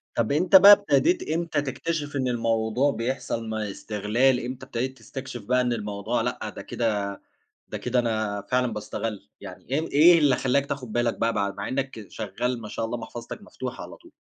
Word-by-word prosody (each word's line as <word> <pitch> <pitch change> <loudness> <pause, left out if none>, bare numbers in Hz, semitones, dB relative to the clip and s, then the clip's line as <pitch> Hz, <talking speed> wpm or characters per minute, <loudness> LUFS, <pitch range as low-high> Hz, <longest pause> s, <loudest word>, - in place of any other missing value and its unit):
طب 115 +1 0
أنتَ 180 +7 +3
بقى 200 +2 +11
ابتديت 305 - +3
إمتى 160 -2 0
تكتشف 145 +2 -3
إن 130 -2 0
الموضوع 115 +2 +1
بيحصل 115 -2 -3
ما 110 -2 -3
استغلال؟ 115 +6 +1
إمتى 130 +1 -6
ابتديت 130 +1 -3
تستكشف 130 -5 -8
بقى 125 +3 +2
إن 125 -1 0
الموضوع 105 +1 -2
لأ - - -3
ده - - -6
كده 105 -4 -2 0.5
ده - - -5
كده 125 0 0
أنا 110 -3 -1
فعلًا 125 -2 +1
باسّتغل؟ 105 -3 -5
يعني - - -10
إيه 155 +4 0
إيه 170 +4 +7
اللي 145 -4 +4
خلّاك 135 +2 +1
تاخذ 140 -3 -5
بالك 120 +1 0
بقى 115 0 +1 0.2
مع 100 - -4
إنّك 130 -5 -3
شغّال 115 +4 -3
ما 110 - -7
شاء 115 - -3
الله 115 +2 -3
محفظتك 115 +1 -8
مفتوحة - - -7
على - - -10
طول؟ - - -19
120 Hz, 180 wpm, -25 LUFS, 110-135 Hz, 0.5 s, بقى